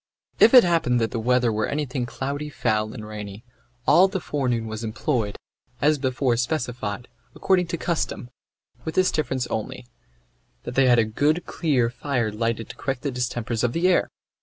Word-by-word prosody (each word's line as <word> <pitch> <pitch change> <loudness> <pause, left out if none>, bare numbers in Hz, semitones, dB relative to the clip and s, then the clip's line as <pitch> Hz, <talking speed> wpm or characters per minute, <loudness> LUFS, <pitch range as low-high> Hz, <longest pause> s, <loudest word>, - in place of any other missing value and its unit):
If 230 - +7
it 250 - +10
happened 165 -9 +2
that 115 -2 0
the 115 - -2
weather 125 0 +2
were 110 0 0
anything 140 -4 -2
cloudy, 140 +4 -4
foul, 110 -6 -1
and 110 -2 -8
rainy, 105 -1 -8 0.4
all 185 +3 +6
the 190 0 -3
forenoon 125 -8 -1
was 110 +1 -5
employed, 110 -1 -2 0.4
as 150 0 +3
before 130 -2 +1
specified, 120 -4 -3 0.3
according 185 -2 +2
to 170 - -3
custom, 160 -7 -3 0.5
with 160 - -5
this 185 0 +3
difference 130 -5 -1
only, 110 +3 -4 0.8
that 120 - -6
they 135 0 +4
had 120 -1 +5
a 115 - +4
good 145 +10 0
clear 130 -8 0
fire 125 -3 -1
lighted 115 +1 -2
to - - -8
correct 135 -2 -4
the 140 - -1
distempers 120 -2 -2
of 120 -1 +1
the 170 +2 +2
air. 185 - +3
125 Hz, 175 wpm, -24 LUFS, 115-150 Hz, 0.8 s, it